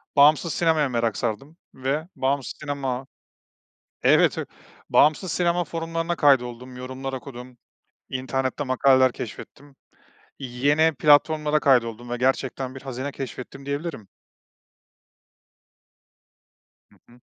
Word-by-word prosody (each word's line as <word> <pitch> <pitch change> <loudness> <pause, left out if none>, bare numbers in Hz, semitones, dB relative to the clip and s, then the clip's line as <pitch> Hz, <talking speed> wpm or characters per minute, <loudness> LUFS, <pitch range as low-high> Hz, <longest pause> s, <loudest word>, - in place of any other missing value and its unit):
bağımsız 150 +3 +5
sinemaya 160 -4 +2
merak 115 -3 -1
sardım 135 +8 -4 0.2
ve 140 +5 -2
bağımsız 135 0 -1
sinema. 135 -3 -3 1.0
Evet, - - +4
evet - - -4 0.4
bağımsız 155 +5 +3
sinema 175 0 +1
forumlarına 165 +1 -3
kaydoldum, 125 -3 +1
yorumlar 130 +1 -6
okudum. 125 -1 -9 0.5
İnternette 130 +2 -2
makaleler 130 0 +4
keşfettim. 135 +5 -9 0.6
Yeni 145 +5 +2
platformlara 150 +2 +4
kaydoldum 120 -4 +1
ve 120 - -2
gerçekten 130 +1 -1
bir 135 - -9
hazine 135 +1 -5
keşfettim 135 0 -8
diyebilirim. 140 - -4 2.9
Hı - - -22 0.2
hı. 120 - -20
135 Hz, 100 wpm, -24 LUFS, 125-150 Hz, 2.9 s, bağımsız